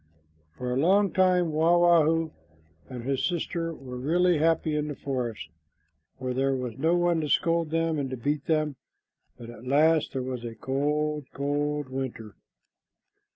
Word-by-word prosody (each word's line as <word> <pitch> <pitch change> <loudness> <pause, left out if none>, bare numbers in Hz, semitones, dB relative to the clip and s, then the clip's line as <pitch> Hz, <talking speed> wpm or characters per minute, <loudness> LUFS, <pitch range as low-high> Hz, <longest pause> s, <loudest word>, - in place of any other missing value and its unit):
For 125 +6 -4
a - - -1
long 195 +6 +3
time 180 -3 +3
Wah 165 +3 +3
wah 175 -2 +5
hoo 165 +1 +1 0.6
and 125 -2 -7
his 135 +1 -1
sister 170 -1 -2
were 130 -5 -8
really 170 +4 +2
happy 160 -1 +2
in 150 0 -1
the 145 - -5
forest, 125 -6 -4 0.7
for 130 -1 -3
there 135 +1 +1
was 125 -3 -4
no 165 +4 +3
one 175 -2 +2
to 150 - -3
scold 165 0 +2
them 165 -1 0
and 135 -2 -2
to 130 - -5
beat 145 +4 -2
them, 155 -3 0 0.6
but 120 -1 -9
at 120 +1 -12
last 155 +3 +3
there 130 -2 -2
was 125 -2 -5
a 115 -1 -6
cold, 150 +4 -1
cold 145 0 -2
winter. 130 -5 -5
150 Hz, 165 wpm, -27 LUFS, 130-165 Hz, 0.7 s, wah